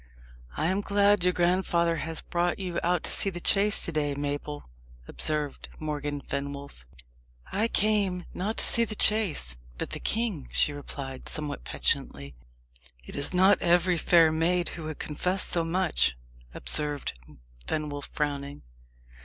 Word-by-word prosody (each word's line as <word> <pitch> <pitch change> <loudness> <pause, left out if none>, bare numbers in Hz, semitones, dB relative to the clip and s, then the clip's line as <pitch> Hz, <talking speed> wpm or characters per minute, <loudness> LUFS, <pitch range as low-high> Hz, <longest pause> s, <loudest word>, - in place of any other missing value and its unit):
"I - - 0
am 190 +4 +1
glad 200 -1 +3
your 180 - +4
grandfather 175 -1 +1
has 160 +1 -4
brought 175 0 0
you 180 -3 -3
out 175 -1 +1
to - - +1
see 195 - +4
the 175 -2 -6
chase 200 +3 +4
to - - -2
day, 145 -2 -1
Mabel," 145 +1 -4 0.4
observed 150 -2 -3
Morgan 145 -2 -4
Fenwolf. 140 - -6 0.7
"I 220 +3 +1
dame 200 -5 +1
not 205 +5 -3
to - - +3
see 235 - +3
the 215 -2 -3
chase, 185 - +2 0.2
but - - -4
the - - -4
king," 215 - 0
she 145 - +3
replied, 135 -2 -6
somewhat 145 - -4
petulantly. 70 +2 -2 0.7
"It - - -10
is 140 - -2
not 190 +2 +4
every 175 0 +3
fair 165 -2 +5
maid 170 +2 +1
who 160 - -7
would 155 -1 -5
confess 180 +5 0
so 170 - +1
much," 165 - +1 0.4
observed 145 - 0 0.5
Fenwolf, 145 -2 -3
frowning. 140 - -3
165 Hz, 145 wpm, -27 LUFS, 145-185 Hz, 0.7 s, fair